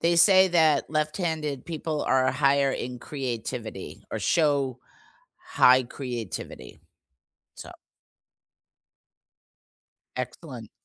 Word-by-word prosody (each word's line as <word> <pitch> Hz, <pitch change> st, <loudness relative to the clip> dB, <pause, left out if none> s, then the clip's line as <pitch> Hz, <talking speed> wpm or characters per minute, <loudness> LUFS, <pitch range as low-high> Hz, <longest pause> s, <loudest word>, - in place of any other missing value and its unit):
They 170 Hz, +1 st, +2 dB
say 190 Hz, +2 st, +6 dB
that 160 Hz, -5 st, +3 dB
left-handed 155 Hz, -3 st, -2 dB
people 160 Hz, -2 st, -3 dB
are 130 Hz, 0 st, +2 dB
higher 140 Hz, 0 st, +2 dB
in 125 Hz, -1 st, -5 dB
creativity 120 Hz, -6 st, -6 dB
or -, -, -3 dB
show 140 Hz, -6 st, +1 dB, 0.6 s
high 130 Hz, -, +4 dB
creativity. 120 Hz, -, -7 dB, 0.8 s
So -, -, -10 dB, 2.4 s
Excellent. -, -, -7 dB
140 Hz, 85 wpm, -26 LUFS, 125-160 Hz, 2.4 s, say